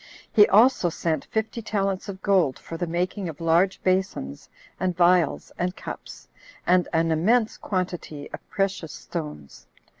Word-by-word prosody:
He 205 -1 +7
also 220 -3 +5
sent 160 -2 -2
fifty 220 +1 -2
talents 195 -3 -2
of 190 -1 -8
gold 185 -10 +3
for 165 - -9
the 175 +1 -2
making 180 +2 -2
of 155 - -9
large 170 +3 +2
basons, 185 - -1 0.3
and 180 -2 -1
vials, 175 -3 +3
and 180 +1 -1
cups, - - -9 0.4
and 180 0 +3
an 165 0 +2
immense 215 +8 +2
quantity 175 -6 -4
of - - -6
precious 195 -5 -2
stones. 150 - -7
180 Hz, 145 wpm, -25 LUFS, 165-195 Hz, 0.4 s, He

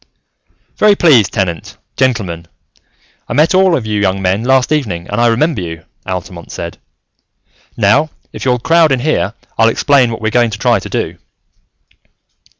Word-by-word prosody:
"Very 210 -1 +4
pleased, 135 - +4
Tenant, 90 -4 -3 0.2
gentlemen. 100 -11 -1 0.8
I - - -2
met 155 +7 +3
all 185 -2 +4
of 120 - -5
you 105 -1 -1
young 95 -1 0
men 95 +3 0
last 130 +2 +2
evening 105 - -2
and 105 +3 -2
I 120 - +4
remember 125 - +1
you," 80 -1 -7 0.2
Altamont 90 -2 -6
said. 85 0 -7 1.0
"Now, 115 +9 +3 0.2
if - - -7
you'll 125 -2 +2
crowd 165 +4 +3
in 130 -2 +1
here, 115 - -1 0.2
I'll 115 0 +5
explain 135 +1 +2
what 115 - -5
we're 110 0 -2
going 120 0 +2
to 105 - -6
try - - +2
to - - -9
do." - - -3
115 Hz, 160 wpm, -14 LUFS, 95-140 Hz, 1.0 s, I'll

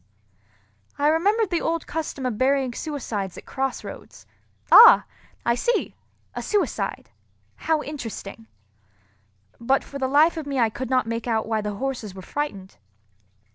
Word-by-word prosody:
I 290 +1 +3
remembered 400 +6 +2
the 345 - 0
old 330 0 -1
custom 305 -4 -4
of 240 -4 -2
burying 265 -1 +2
suicides 230 - -4
at - - -11
cross 270 -1 -3
roads: - - -11 0.5
"Ah! 470 +2 +9 0.4
I 235 - +3
see, 475 - -1 0.4
a - - -5
suicide. 415 -2 -2 0.5
How 315 -1 0
interesting!" 225 -6 -7 1.1
But 265 +4 +1
for 280 - -8
the 260 - 0
life 305 +5 +4
of 310 -3 -5
me 275 -1 -3
I 230 -3 +2
could 260 +2 -5
not 255 -2 +2
make 230 +1 -4
out 220 -2 0
why 220 -1 0
the 210 -1 -4
horses 240 -5 -4
were 190 - -9
frightened. 200 -11 -5
265 Hz, 150 wpm, -24 LUFS, 230-310 Hz, 1.1 s, Ah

